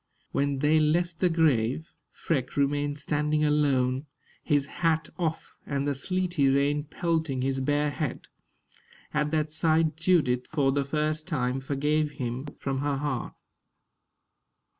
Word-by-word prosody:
When 140 0 0
they 150 +3 +3
left 165 +2 +1
the 180 - +3
grave, 155 -3 +1 0.2
Freke 135 -5 -2
remained 145 +1 +1
standing 150 +1 0
alone, 140 -2 +2 0.4
his 145 -2 +2
hat 160 +1 0
off, 160 -2 -3
and 140 0 -2
the 145 - +1
sleety 175 0 0
rain 145 +2 +2
pelting 160 -5 -1
his 135 0 0
bare 145 +2 +1
head. 150 -1 -3 0.9
At 150 0 +1
that 155 -1 0
sight 160 -1 +2
Judith, 155 -8 +2
for 140 -4 +1
the 140 +1 +1
first 155 +2 -1
time, 130 -6 -1
forgave 145 +3 0
him 125 +2 -4
from 135 -1 -2
her 145 0 0
heart. 135 -3 -3
145 Hz, 135 wpm, -27 LUFS, 135-155 Hz, 0.9 s, they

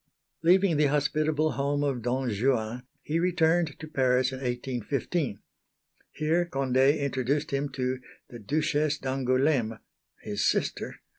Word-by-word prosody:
Leaving 180 0 +4
the 150 0 +4
hospitable 150 +2 +1
home 140 +3 -1
of 135 -4 -1
Don 125 +3 -1
Juan, 115 +1 0 0.2
he 160 +2 -1
returned 170 -2 +2
to 155 - -8
Paris 130 -3 +2
in 130 - -6
1815. 125 - -2 0.8
Here 160 +3 +1
Condé 135 0 +2
introduced 140 0 -1
him 140 +1 -1
to 130 -1 -2 0.3
the 120 - -10
Duchesse 150 +5 0
d'Angoulême 130 -2 +1 0.5
(his 105 0 -2
sister!) - - -2
135 Hz, 125 wpm, -28 LUFS, 125-155 Hz, 0.8 s, Leaving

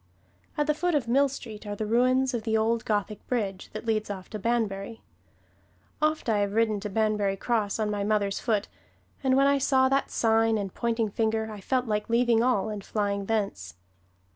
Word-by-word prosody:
At 295 - +2
the 300 - +2
foot 350 +2 0
of 265 -6 0
Mill 275 +4 +3
Street 225 -5 -8
are 205 - -3
the 215 - -3
ruins 255 +4 +2
of 235 - -1
the 220 0 0
old 225 +1 +1
Gothic 210 -1 -2
bridge 200 -6 -2
that - - -6
leads 215 -2 0
off 190 -2 -7
to 215 - -5
Banbury. 220 -1 -2 1.0
Oft 310 +1 +1
have 225 -4 +1
I - - +1
ridden 215 +1 +1
to 210 - -5
Banbury 210 -2 0
Cross 215 -2 0
on 215 -1 -1
my 205 -1 -1
mother's 200 -1 0
foot, 215 -4 0 0.6
and 260 -1 +3
when 275 - +5
I 280 0 +3
saw 260 -1 +3
that 275 +1 +1
sign 225 -1 +2
and 195 -3 -4
pointing 230 -2 -1
finger 220 0 0
I 210 -2 -8
felt 255 +5 0
like 210 -1 -2
leaving 235 -1 +3
all 230 -4 +1
and 210 -2 -5
flying 200 -2 -2
thence. 195 - -2
220 Hz, 195 wpm, -27 LUFS, 205-240 Hz, 1.0 s, when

